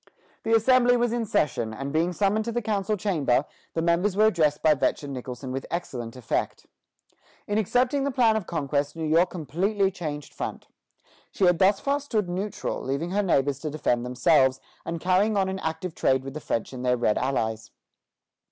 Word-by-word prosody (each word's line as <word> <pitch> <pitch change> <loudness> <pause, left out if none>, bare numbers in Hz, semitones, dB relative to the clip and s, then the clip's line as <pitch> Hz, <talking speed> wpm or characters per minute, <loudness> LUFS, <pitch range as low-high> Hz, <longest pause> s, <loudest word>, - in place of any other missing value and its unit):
The 225 0 +2
Assembly 245 +2 +4
was 240 -1 +1
in 235 -2 -1
session, 120 - 0
and 135 +5 -5
being 165 +3 +2
summoned 205 +4 +1
to 235 - -2
the 240 0 -2
council 210 0 -1
chamber, 155 -9 +1 0.3
the 165 - 0
members 175 +4 +1
were 215 - +5
addressed 155 -8 +2
by 155 - +6
Vetch 145 - 0
and 140 -1 -6
Nicholson 130 0 -6
with 135 +1 -4
excellent 125 -9 -5
effect. 125 -3 -3 0.8
In 205 +1 0
accepting 250 +6 +1
the 280 - 0
plan 240 -4 +3
of 215 -5 -2
conquest, 145 -2 -1
New 165 -1 -3
York 165 +4 +3
completely 190 +6 0
changed 150 -5 -6
front. - - -6 0.6
She 195 - +1
had 175 -1 +4
thus 195 +1 +4
far 280 +1 0
stood 225 -9 -1
neutral, 190 +3 -3
leaving 140 +7 -3
her 205 +2 +1
neighbors 140 -7 +1
to 155 - -4
defend 125 -5 0
themselves, 130 +1 +3 0.3
and 165 0 -3
carrying 190 +5 +2
on 190 -1 +2
an 190 0 -3
active 160 +1 -4
trade 130 -3 +1
with 135 0 -7
the 155 - -6
French 115 0 -3
and 125 -1 -6
their 125 0 +2
red 115 -3 +1
allies. 110 -4 -2
170 Hz, 190 wpm, -26 LUFS, 135-205 Hz, 0.8 s, by